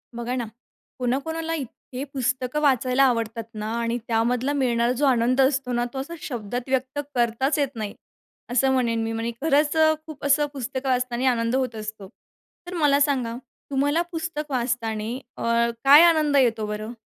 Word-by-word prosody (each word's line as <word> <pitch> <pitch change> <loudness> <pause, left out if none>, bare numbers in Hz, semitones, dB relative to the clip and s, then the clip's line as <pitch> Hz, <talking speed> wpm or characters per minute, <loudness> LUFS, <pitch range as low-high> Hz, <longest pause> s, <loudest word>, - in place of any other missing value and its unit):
बघा 240 +1 -3
ना, 245 -2 -2 0.5
कोणा 250 +1 +1
कोणाला 325 +2 -4
इतके 265 -2 -6
पुस्तकं 260 +2 -1
वाचायला 260 -1 +3
आवडतात 230 -3 0
ना 215 0 -4
आणि 235 0 -1
त्यामधला 240 +4 +1
मिळणारा 240 -4 +1
जो 260 +4 0
आनंद 255 0 +3
असतो 265 -1 +1
ना, 240 0 +1
तो 265 - -4
असा 290 +6 -6
शब्दांत 245 0 -5
व्यक्त 265 +2 -1 0.2
करताच 240 +5 +1
येत 275 -2 -1
नाही. 215 -2 -4 0.6
असं 265 +2 +3
म्हणेन 230 -3 +1
मी 225 - -2
म्हणजे 225 +1 -2
खरंच 295 0 +2
अ, 315 0 +5
खूप 305 -3 -9
असं 290 +1 +4
पुस्तकं 265 0 -4
वाचताना 250 0 +1
आनंद 230 0 0
होत 255 -3 -1
असतो. 215 -2 -7 0.6
तर 360 - -6
मला 295 -5 +3
सांगा 260 -5 +1 0.4
तुम्हाला 285 +4 +2
पुस्तक 315 -2 -4
वाचताना 235 -2 -2 0.2
अ, 235 0 +1
काय 285 +3 +9
आनंद 305 -3 +2
येतो 230 -5 +2
बरं? 215 +2 -5
255 Hz, 165 wpm, -24 LUFS, 235-280 Hz, 0.6 s, काय